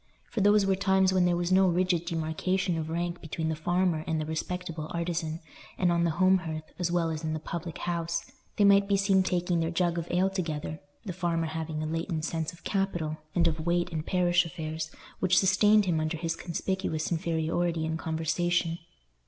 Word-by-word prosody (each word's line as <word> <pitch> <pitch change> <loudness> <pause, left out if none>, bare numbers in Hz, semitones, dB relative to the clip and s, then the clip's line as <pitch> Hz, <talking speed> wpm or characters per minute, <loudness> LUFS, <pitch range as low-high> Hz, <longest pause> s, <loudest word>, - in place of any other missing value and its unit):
For 220 - -1
those 205 0 +5
were 195 0 +3
times 190 -1 +3
when 185 -1 +3
there 175 -1 +2
was 175 +1 -1
no 190 0 +5
rigid 175 -1 +1
demarcation 170 +3 -1
of 160 -1 -3
rank 170 +1 -2
between 160 0 -3
the 160 - -1
farmer 175 0 +1
and 160 -1 0
the 155 - -2
respectable 160 0 -4
artisan, 170 -1 -2 0.4
and 180 -1 +2
on 170 0 +2
the - - +2
home 185 +1 +5
hearth, 160 -3 -5 0.2
as 175 -1 0
well 170 -2 +1
as 155 0 -4
in 155 -1 -1
the 155 - -2
public 170 +1 -5
house, 170 -1 -2 0.3
they 210 - +4
might 200 0 +6
be 200 -1 +3
seen 195 -1 +3
taking 180 -1 0
their 165 0 0
jug 175 0 0
of 170 - -5
ale 185 +2 +2
together; 155 -4 -3 0.3
the 185 - -4
farmer 170 -2 0
having 160 -1 -3
a - - -2
latent 165 0 -2
sense 160 -2 -2
of 170 - -17
capital, 175 -6 -1 0.2
and 170 -1 +4
of 160 -1 -1
weight 175 0 +1
in 160 -2 -2
parish 175 +1 +2
affairs, 160 -2 -5 0.3
which 185 -1 +3
sustained 205 +2 +5
him 170 -4 +1
under 155 +1 -1
his 165 0 -2
conspicuous 170 -1 -2
inferiority 165 0 0
in 160 0 -1
conversation. 165 +1 0
170 Hz, 200 wpm, -28 LUFS, 160-185 Hz, 0.4 s, might